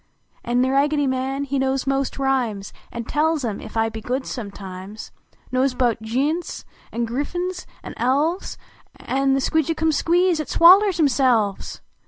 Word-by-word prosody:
An 245 Hz, +1 st, +1 dB
The 260 Hz, -, +1 dB
Raggedv 285 Hz, +1 st, +2 dB
Man, 265 Hz, +2 st, -1 dB
he 280 Hz, 0 st, -2 dB
knows 265 Hz, 0 st, 0 dB
most 275 Hz, 0 st, -1 dB
rhymes 250 Hz, -8 st, -1 dB, 0.2 s
An 235 Hz, -, -5 dB
tells 305 Hz, +3 st, 0 dB
cm, 215 Hz, -4 st, -3 dB
ef -, -, -10 dB
1 225 Hz, 0 st, +1 dB
he 220 Hz, -, -6 dB
good, 255 Hz, +4 st, -3 dB
sometimes: 200 Hz, -2 st, -8 dB, 0.4 s
Knows 255 Hz, 0 st, +1 dB
bout 240 Hz, -3 st, +1 dB
fiitints, 275 Hz, +10 st, -2 dB, 0.3 s
an 235 Hz, 0 st, -1 dB
Griffuns, 350 Hz, +10 st, -3 dB, 0.2 s
an -, -, -7 dB
Elves, 290 Hz, +9 st, 0 dB, 0.4 s
An 270 Hz, 0 st, 0 dB
the -, -, +1 dB
Sqtiidgicum 320 Hz, +2 st, +1 dB
Squees 345 Hz, +2 st, +2 dB
at 310 Hz, -, -3 dB
swallers 375 Hz, +2 st, +6 dB
therselves 250 Hz, -, +1 dB
270 Hz, 150 wpm, -22 LUFS, 235-305 Hz, 0.4 s, swallers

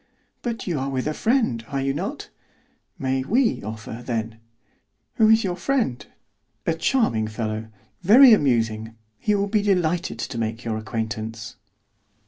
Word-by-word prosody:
"But 235 Hz, -2 st, -4 dB
you 170 Hz, -6 st, -1 dB
are 135 Hz, +1 st, -2 dB
with 130 Hz, -2 st, -2 dB
a 155 Hz, -, -1 dB
friend, 225 Hz, -, +1 dB
are 140 Hz, -1 st, -3 dB
you 135 Hz, 0 st, 0 dB
not?" 195 Hz, -, -5 dB, 0.7 s
"May 130 Hz, -3 st, -1 dB
we 235 Hz, -, +1 dB
offer, 110 Hz, +2 st, -7 dB
then?" 115 Hz, -2 st, -3 dB, 0.8 s
"Who 220 Hz, -1 st, +5 dB
is 220 Hz, +1 st, +5 dB
your 180 Hz, -3 st, -1 dB
friend?" 220 Hz, -, -1 dB, 0.6 s
"A 165 Hz, -, +2 dB
charming 160 Hz, -, +1 dB
fellow, 110 Hz, 0 st, -4 dB, 0.3 s
very 235 Hz, +7 st, +8 dB
amusing. 115 Hz, -, +1 dB, 0.2 s
He 210 Hz, -, +1 dB
will 200 Hz, 0 st, +1 dB
be 210 Hz, +1 st, +1 dB
delighted 180 Hz, -3 st, 0 dB
to 115 Hz, -, -4 dB
make 115 Hz, +1 st, -3 dB
your 110 Hz, -1 st, -1 dB
acquaintance." 110 Hz, 0 st, -5 dB
135 Hz, 145 wpm, -23 LUFS, -, 0.8 s, very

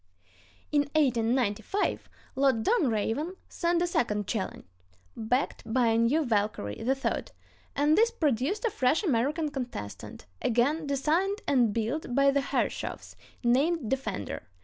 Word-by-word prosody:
In 295 Hz, -1 st, +4 dB
1895 245 Hz, -, +1 dB, 0.3 s
Lord 265 Hz, -5 st, +2 dB
Dunraven 295 Hz, -, 0 dB
sent 345 Hz, 0 st, 0 dB
a -, -, +2 dB
second 210 Hz, -11 st, 0 dB
challenge, 195 Hz, 0 st, -4 dB, 0.5 s
backed 245 Hz, +5 st, -1 dB
by 240 Hz, -1 st, +3 dB
a 225 Hz, -, +2 dB
new 280 Hz, +7 st, +2 dB
Valkyrie 205 Hz, -, -1 dB
(III); 265 Hz, +3 st, -1 dB, 0.5 s
and 295 Hz, +2 st, +3 dB
this 455 Hz, +4 st, +4 dB
produced 315 Hz, -, 0 dB
a 460 Hz, -, +1 dB
fresh 275 Hz, +7 st, +1 dB
American 295 Hz, -, 0 dB
contestant, 245 Hz, -, -6 dB, 0.2 s
again 285 Hz, +7 st, +1 dB
designed 330 Hz, +9 st, 0 dB
and 245 Hz, -6 st, +3 dB
built 240 Hz, +5 st, -2 dB
by 275 Hz, 0 st, +5 dB
the 280 Hz, 0 st, +1 dB
Herreshoffs, 275 Hz, -, -3 dB, 0.3 s
named 265 Hz, +2 st, +2 dB
Defender. 265 Hz, -, -3 dB
270 Hz, 125 wpm, -28 LUFS, 230-310 Hz, 0.5 s, by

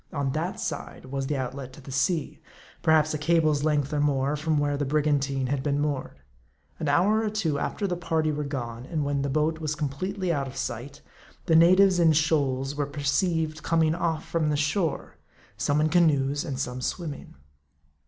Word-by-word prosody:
On 140 Hz, -3 st, -1 dB
that 160 Hz, +6 st, -3 dB
side, 145 Hz, -4 st, -5 dB
was 135 Hz, +1 st, -3 dB
the 145 Hz, -1 st, -1 dB
outlet 130 Hz, 0 st, -5 dB
to -, -, -12 dB
the 135 Hz, -1 st, -10 dB
sea; 150 Hz, +4 st, -1 dB, 0.4 s
perhaps 155 Hz, -1 st, +3 dB
a 155 Hz, -, -2 dB
cable's 155 Hz, -2 st, +2 dB
length 150 Hz, -1 st, +1 dB
or 150 Hz, -, +1 dB
more 140 Hz, 0 st, +1 dB
from 155 Hz, +1 st, 0 dB
where 145 Hz, 0 st, +1 dB
the 145 Hz, -, -1 dB
brigantine 140 Hz, -2 st, +1 dB
had 135 Hz, +1 st, -1 dB
been 145 Hz, 0 st, 0 dB
moored. 145 Hz, -, -2 dB, 0.6 s
An 155 Hz, -, -1 dB
hour 195 Hz, +9 st, +3 dB
or 220 Hz, -, 0 dB
two 175 Hz, -9 st, -1 dB
after 205 Hz, -, -2 dB
the 180 Hz, -2 st, -1 dB
party 160 Hz, -3 st, 0 dB
were 150 Hz, 0 st, -2 dB
gone, 125 Hz, -4 st, -5 dB
and 155 Hz, -4 st, -2 dB
when 140 Hz, -1 st, 0 dB
the 140 Hz, -, -1 dB
boat 155 Hz, +3 st, 0 dB
was 155 Hz, -2 st, -2 dB
completely 175 Hz, +6 st, -2 dB
out 140 Hz, -3 st, -1 dB
of 135 Hz, +1 st, -9 dB
sight, 135 Hz, +5 st, -5 dB, 0.4 s
the 165 Hz, -, +3 dB
natives 185 Hz, +3 st, +6 dB
in 165 Hz, -2 st, +5 dB
shoals 140 Hz, -4 st, +1 dB
were 145 Hz, -1 st, -2 dB
perceived 155 Hz, +2 st, 0 dB
coming 160 Hz, -1 st, +2 dB
off 165 Hz, -2 st, -2 dB
from 160 Hz, -2 st, 0 dB
the 150 Hz, -, +1 dB
shore; 155 Hz, +4 st, -1 dB, 0.4 s
some 145 Hz, +1 st, +1 dB
in 155 Hz, -, +3 dB
canoes, 145 Hz, -4 st, +2 dB
and 140 Hz, -4 st, -4 dB
some 125 Hz, -1 st, -3 dB
swimming. 150 Hz, +1 st, -5 dB
150 Hz, 190 wpm, -26 LUFS, 140-160 Hz, 0.6 s, natives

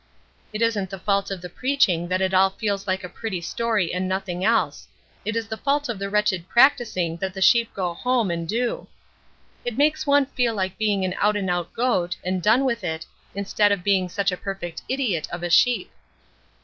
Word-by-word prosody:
It 215 Hz, +2 st, -1 dB
isn't 210 Hz, -5 st, 0 dB
the 195 Hz, -, -6 dB
fault 200 Hz, +1 st, 0 dB
of 195 Hz, -3 st, -5 dB
the -, -, -4 dB
preaching 195 Hz, -7 st, +1 dB
that 185 Hz, +1 st, 0 dB
it 190 Hz, 0 st, 0 dB
all 190 Hz, +1 st, +5 dB
feels 200 Hz, 0 st, -3 dB
like 190 Hz, +1 st, -1 dB
a -, -, -4 dB
pretty 195 Hz, 0 st, -5 dB
story 210 Hz, +1 st, -1 dB
and 185 Hz, +1 st, -1 dB
nothing 185 Hz, -1 st, -3 dB
else; 225 Hz, +3 st, +1 dB, 0.4 s
it 215 Hz, -, -2 dB
is 225 Hz, -1 st, -2 dB
the 220 Hz, -, -5 dB
fault 285 Hz, +1 st, 0 dB
of 225 Hz, -5 st, -3 dB
the 200 Hz, 0 st, -3 dB
wretched 200 Hz, -4 st, 0 dB
practicing 220 Hz, -, +3 dB
that 190 Hz, +2 st, -4 dB
the -, -, -5 dB
sheep 230 Hz, +4 st, +4 dB
go 180 Hz, -3 st, -2 dB
home 240 Hz, 0 st, 0 dB
and 170 Hz, -1 st, -4 dB
do. 235 Hz, +3 st, -1 dB, 0.8 s
It 240 Hz, -2 st, -4 dB
makes 305 Hz, +1 st, +2 dB
one 285 Hz, 0 st, +4 dB
feel 245 Hz, -4 st, -1 dB
like 190 Hz, 0 st, -3 dB
being 205 Hz, -3 st, +1 dB
an 185 Hz, -, -2 dB
out 210 Hz, +1 st, +3 dB
and 190 Hz, -3 st, -1 dB
out 175 Hz, -1 st, -2 dB
goat, 185 Hz, -8 st, 0 dB
and 185 Hz, 0 st, -1 dB
done 230 Hz, +8 st, +4 dB
with 235 Hz, -5 st, -1 dB
it, 160 Hz, -2 st, -3 dB, 0.3 s
instead 200 Hz, +1 st, +2 dB
of 200 Hz, -3 st, 0 dB
being 190 Hz, -2 st, +2 dB
such 195 Hz, +1 st, 0 dB
a 180 Hz, -, -3 dB
perfect 175 Hz, -5 st, -6 dB
idiot 245 Hz, -, -1 dB
of 175 Hz, 0 st, -5 dB
a 175 Hz, -, -2 dB
sheep." 245 Hz, +7 st, +3 dB
200 Hz, 210 wpm, -23 LUFS, 180-230 Hz, 0.8 s, all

